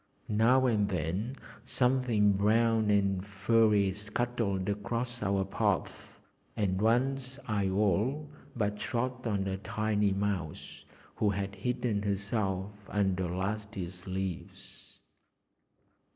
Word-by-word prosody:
Now 120 +5 +4
and 105 -5 +2
then 95 - -2 0.3
something 125 -5 +2
brown 110 +2 +3
and 100 -2 +2
furry 105 0 +3
scuttled 105 -2 -2
across 115 +4 -2
our 100 -1 +1
path, 95 - -2 0.4
and 95 -2 0
once 130 +3 +1
I 100 -3 +1
all 105 - +1 0.3
but 105 -3 -1
trod 125 +2 -2
on 100 -3 0
a 95 0 -2
tiny 105 0 0
mouse, 95 -6 -3 0.3
who 105 - +2
had 100 0 -2
hidden 120 +1 -1
herself 100 -1 -1 0.2
under 95 -3 0
last 100 +4 -3
year's 90 0 -6
leaves. 95 -2 -6
105 Hz, 110 wpm, -31 LUFS, 95-115 Hz, 0.4 s, Now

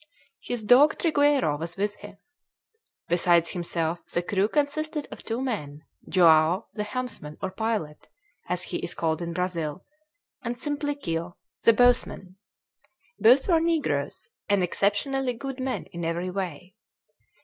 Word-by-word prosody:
His 245 -2 -4
dog 255 +7 +6
Trigueiro 285 - +2
was 165 +2 -5
with 205 +1 -1
him. 205 -1 -12 0.9
Besides 170 -1 +3
himself, 170 -1 -2
the 175 - 0
crew 195 +2 +1
consisted 300 +3 -1
of - - -9
two 225 +1 -3
men: 150 - -4 0.3
Joao, 170 +1 +5
the 210 - -3
helmsman, 210 -9 -4
or 190 - -3
pilot, 200 -8 -3 0.4
as 180 0 -1
he - - -4
is 170 - -3
called 160 -1 -1
in 170 0 -3
Brazil, 175 -2 -3 0.6
and 240 0 -2
Simplicio, 280 - -3 0.3
the 230 - +7
bowsman. 220 -5 +2 0.8
Both 250 +5 +6
were 340 -4 +4
negroes 330 +4 -1 0.2
and 200 -2 +3
exceptionally 245 +9 0
good 265 +3 -6
men 260 0 -2
in 170 -2 -6
every 170 +2 -2
way. 180 -1 -5
200 Hz, 135 wpm, -26 LUFS, 170-255 Hz, 0.9 s, the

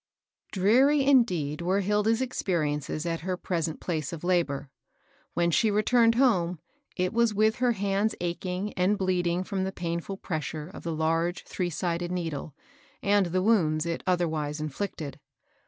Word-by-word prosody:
|REARY 265 +9 +4
indeed 180 - +3
were 185 +3 +1
Hilda's 210 +4 +2
expenences 155 - -2
at 165 -1 -1
her 180 +1 -3
present 165 -4 -2
place 155 -5 -3
of 170 -2 -7
labor. 145 -6 0 0.6
When 170 0 +2
she 220 +7 +3
returned 230 +2 +3
home, 185 -9 +2 0.4
it 185 0 -1
was 230 -2 +2
with 220 +2 +3
her 245 -1 +2
hands 200 +1 0
ach 175 0 -3
ing 185 +3 -3
and 185 +3 +2
bleeding 180 -2 0
from 190 0 -2
the 190 - -2
painAil 170 +2 -4
pressure 155 0 -4
of - - -9
the 170 - -3
large 165 +2 0
three 180 -2 -3
sided 175 +1 -2
needle, 165 -5 -4 0.5
and 200 -2 +3
the 185 +2 0
wounds 160 -8 +2
it 170 0 -2
otherwise 160 -4 0
inflicted. 155 -1 -4
180 Hz, 155 wpm, -27 LUFS, 165-205 Hz, 0.6 s, |REARY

